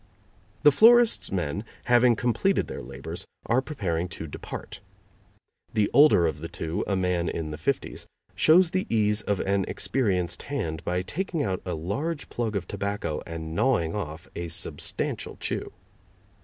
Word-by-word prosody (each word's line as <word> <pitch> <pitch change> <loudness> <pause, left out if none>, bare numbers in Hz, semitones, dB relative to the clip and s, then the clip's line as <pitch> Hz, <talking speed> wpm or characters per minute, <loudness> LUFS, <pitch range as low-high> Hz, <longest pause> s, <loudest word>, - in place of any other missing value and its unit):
The 150 - +8
florist's 235 - +6
men, 90 +1 -2 0.2
having 120 0 +5
completed 125 - +1
their - - -6
labors, 70 +9 -7 0.2
are 120 +3 +2
preparing 95 - -2
to - - -5
depart. 75 - -8 0.9
The 105 -2 +2
older 140 - +7
of 80 -3 -1
the 80 - -5
two, 80 0 -3
a 100 - +1
man 90 -2 0
in 80 -2 -4
the 75 - -5
fifties, - - -2 0.3
shows 170 +2 +5
the 185 +1 -1
ease 105 -1 +2
of 100 -2 -1
an 100 0 +1
experienced 95 -9 0
hand 85 - -3
by 90 +2 -1
taking 170 - -2
out 95 -2 -2
a 90 - -1
large 140 - -3
plug 115 -3 -2
of 95 -3 -2
tobacco 100 -5 -3
and 80 -1 -6
gnawing 85 -6 +2
off 80 -4 -5
a 85 - -3
substantial 85 - -2
chew. - - -3
100 Hz, 155 wpm, -26 LUFS, 85-125 Hz, 0.9 s, The